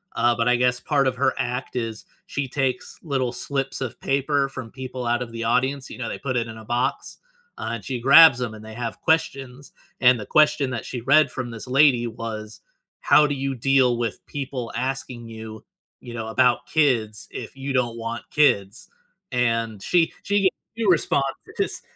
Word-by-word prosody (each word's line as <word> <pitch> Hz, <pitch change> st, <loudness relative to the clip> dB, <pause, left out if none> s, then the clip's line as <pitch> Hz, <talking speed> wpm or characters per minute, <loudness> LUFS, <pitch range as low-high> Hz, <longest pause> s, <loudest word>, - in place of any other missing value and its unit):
uh, 120 Hz, 0 st, +3 dB
but 115 Hz, 0 st, 0 dB
I 125 Hz, -, +4 dB
guess 125 Hz, 0 st, +2 dB
part 140 Hz, -1 st, +1 dB
of 130 Hz, -, +1 dB
her 130 Hz, -1 st, +2 dB
act 125 Hz, +1 st, -3 dB
is 115 Hz, -3 st, -4 dB, 0.2 s
she 140 Hz, -2 st, -3 dB
takes 130 Hz, -1 st, -2 dB
little 135 Hz, -6 st, -1 dB
slips 135 Hz, +2 st, -3 dB
of 130 Hz, -, -5 dB
paper 140 Hz, 0 st, +1 dB
from 130 Hz, -4 st, -8 dB
people 130 Hz, -1 st, -6 dB
out 120 Hz, +1 st, +1 dB
of 120 Hz, -2 st, -5 dB
the 115 Hz, 0 st, -5 dB
audience, 130 Hz, +4 st, 0 dB
you -, -, -10 dB
know, 115 Hz, -, -3 dB
they -, -, -4 dB
put 130 Hz, -2 st, -3 dB
it 115 Hz, -1 st, -1 dB
in 110 Hz, -, -9 dB
a 110 Hz, -, -11 dB
box, 120 Hz, +2 st, -2 dB, 0.4 s
uh, -, -, -3 dB
and 110 Hz, -5 st, -6 dB
she 125 Hz, +1 st, -3 dB
grabs 140 Hz, 0 st, +8 dB
'em, 120 Hz, -3 st, -3 dB
and 110 Hz, 0 st, -12 dB
they 110 Hz, -, -9 dB
have 115 Hz, 0 st, -5 dB
questions, 140 Hz, -5 st, -1 dB, 0.3 s
and 125 Hz, -1 st, +6 dB
the 105 Hz, -, -6 dB
question 150 Hz, -1 st, +3 dB
that 120 Hz, -3 st, -4 dB
she 125 Hz, -, -5 dB
read 145 Hz, +6 st, +4 dB
from 125 Hz, -2 st, -5 dB
this 115 Hz, +2 st, -8 dB
lady 130 Hz, -2 st, +4 dB
was, 110 Hz, -1 st, -7 dB, 0.4 s
"How 150 Hz, 0 st, +5 dB
do 145 Hz, -, -2 dB
you 135 Hz, 0 st, -2 dB
deal 130 Hz, -1 st, +3 dB
with 115 Hz, -2 st, -3 dB
people 130 Hz, -4 st, -5 dB
asking 125 Hz, -2 st, -4 dB
you, 110 Hz, -1 st, -9 dB, 0.4 s
you 120 Hz, -1 st, -9 dB
know, 110 Hz, -1 st, -4 dB
about 125 Hz, +1 st, +2 dB
kids, 115 Hz, -10 st, +1 dB
if -, -, -7 dB
you 135 Hz, +1 st, -4 dB
don't 120 Hz, -2 st, 0 dB
want 115 Hz, +1 st, -5 dB
kids?" 100 Hz, -10 st, +2 dB, 0.4 s
and, 115 Hz, -4 st, 0 dB
she 170 Hz, -2 st, +2 dB
she 205 Hz, 0 st, +1 dB
gave 190 Hz, -, +6 dB, 0.3 s
2 225 Hz, -3 st, -1 dB
responses, 140 Hz, -5 st, +2 dB, 0.3 s
'cause -, -, -2 dB
125 Hz, 195 wpm, -23 LUFS, 115-135 Hz, 0.4 s, grabs